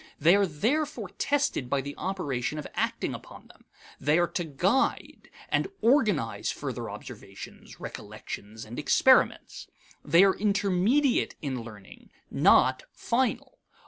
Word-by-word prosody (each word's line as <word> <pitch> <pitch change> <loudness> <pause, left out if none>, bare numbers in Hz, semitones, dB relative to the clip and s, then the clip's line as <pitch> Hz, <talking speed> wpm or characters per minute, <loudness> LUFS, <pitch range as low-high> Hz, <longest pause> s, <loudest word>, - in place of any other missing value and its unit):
They 165 +6 +5
are 200 -1 +3
therefore 235 - -1
tested 280 - 0
by 140 +1 +1
the 140 +2 -7
operation 150 -8 -3
of 150 - -5
acting - - -2
upon - - -11
them. - - -20 0.3
They 150 +4 +2
are 175 - +3
to 175 - -2
guide 185 - -1 0.2
and - - +1
organize 215 - +1
further - - -5
observations, - - -11
recollections, 110 +2 -8
and 115 +3 -7
experiments. - - +3 0.4
They 170 +5 +5
are 195 -1 +5
intermediate 205 +6 +1
in 130 -4 -3
learning, 105 -4 -13 0.2
not 130 0 +4
final. 250 +2 -2
180 Hz, 125 wpm, -27 LUFS, 135-230 Hz, 0.4 s, They